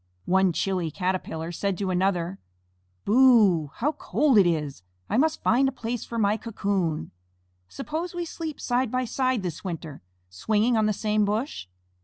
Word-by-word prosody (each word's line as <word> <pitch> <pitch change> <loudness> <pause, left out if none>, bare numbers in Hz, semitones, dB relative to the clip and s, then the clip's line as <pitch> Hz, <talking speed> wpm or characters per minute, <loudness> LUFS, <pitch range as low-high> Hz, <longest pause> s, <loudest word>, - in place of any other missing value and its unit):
One 190 0 +3
chilly 180 0 -1
Caterpillar 175 -1 -3
said 195 +2 -2
to 195 -2 -2
another, 180 0 0 0.7
"Boo - - -1 0.5
oo! 140 - -14
How 290 +6 0
cold 290 -6 +2
it 190 - +5
is! 150 - -2 0.3
I - - +2
must 315 +4 +1
find 265 +3 +3
a - - -5
place 245 -2 -4
for 235 - -6
my 210 -1 +2
cocoon. 195 -7 -2 0.6
Suppose 320 +5 -5
we 350 -1 -2
sleep 320 -2 -6
side 245 0 0
by 255 +2 -1
side 255 -2 0
this 175 -4 -5
winter, 165 -5 -6 0.3
swinging 215 - +1
on 215 -1 +2
the - - +2
same 210 +1 0
bush?" 210 - -2
210 Hz, 165 wpm, -26 LUFS, 180-250 Hz, 0.7 s, it